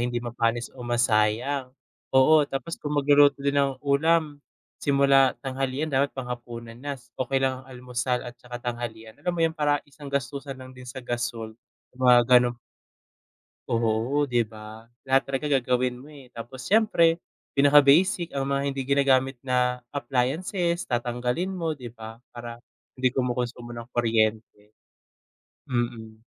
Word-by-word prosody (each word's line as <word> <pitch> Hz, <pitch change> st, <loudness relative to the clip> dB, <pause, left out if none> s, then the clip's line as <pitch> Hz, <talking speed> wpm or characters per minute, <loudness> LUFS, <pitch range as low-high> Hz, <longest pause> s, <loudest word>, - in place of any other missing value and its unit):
hindi 120 Hz, 0 st, -1 dB
mapanis 120 Hz, 0 st, -1 dB
o 130 Hz, -, -13 dB
masayang, 120 Hz, +2 st, +1 dB, 0.4 s
oo 145 Hz, +4 st, +6 dB
tapos 135 Hz, +5 st, -5 dB
kung 150 Hz, 0 st, -3 dB
mag-luluto 145 Hz, 0 st, +5 dB
din 140 Hz, -, +2 dB
ng 135 Hz, -1 st, 0 dB
ulam, 150 Hz, +1 st, +2 dB, 0.4 s
simula 140 Hz, -1 st, +4 dB
tanghalian 135 Hz, +3 st, -2 dB
dapat 140 Hz, +2 st, +3 dB
pang-hapunan 120 Hz, -2 st, -7 dB
na 145 Hz, 0 st, -4 dB, 0.2 s
okey 130 Hz, +1 st, 0 dB
lang 130 Hz, -1 st, -1 dB
almusal 125 Hz, 0 st, -3 dB
at 120 Hz, -, -7 dB
saka 125 Hz, -1 st, -8 dB
tanghalian 120 Hz, -2 st, -5 dB
alam 180 Hz, -, -1 dB
mo 165 Hz, -, 0 dB
yun 165 Hz, -, +3 dB
parang 145 Hz, -2 st, +1 dB
isang 145 Hz, 0 st, -13 dB
gastusan 140 Hz, 0 st, -3 dB
lang 130 Hz, 0 st, -11 dB
din 125 Hz, 0 st, -12 dB
sa 130 Hz, +2 st, -7 dB
gasul 120 Hz, -2 st, -3 dB, 0.5 s
mga 125 Hz, -1 st, +6 dB
ganun 125 Hz, -1 st, +5 dB, 1.1 s
Oo 115 Hz, +5 st, +1 dB
di 120 Hz, -2 st, +2 dB
ba? 110 Hz, +1 st, -11 dB, 0.2 s
Lahat 135 Hz, 0 st, +3 dB
talaga 135 Hz, +2 st, -2 dB
gagawin 125 Hz, 0 st, 0 dB
mo 135 Hz, -, -13 dB
eh 140 Hz, -5 st, -14 dB
tapos 120 Hz, +3 st, -9 dB
siyempre, 175 Hz, -6 st, +3 dB, 0.4 s
pinaka-basic 145 Hz, +5 st, +5 dB
ang 135 Hz, -1 st, -2 dB
mga 140 Hz, 0 st, 0 dB
hindi 135 Hz, 0 st, -3 dB
ginagamit 135 Hz, -1 st, +3 dB
na 125 Hz, -1 st, +1 dB
appliances 155 Hz, +7 st, -1 dB
tatanggalin 125 Hz, +8 st, -1 dB
mo 165 Hz, -4 st, -2 dB
di 125 Hz, -4 st, -9 dB
ba, 115 Hz, 0 st, -10 dB
para 120 Hz, 0 st, -8 dB, 0.3 s
hindi 130 Hz, 0 st, +2 dB
kumukonsumo 125 Hz, -2 st, -3 dB
ng 115 Hz, 0 st, -8 dB
kuryente. 110 Hz, -2 st, 0 dB, 1.0 s
Hmm. 115 Hz, -3 st, -3 dB
130 Hz, 140 wpm, -26 LUFS, 120-140 Hz, 1.1 s, oo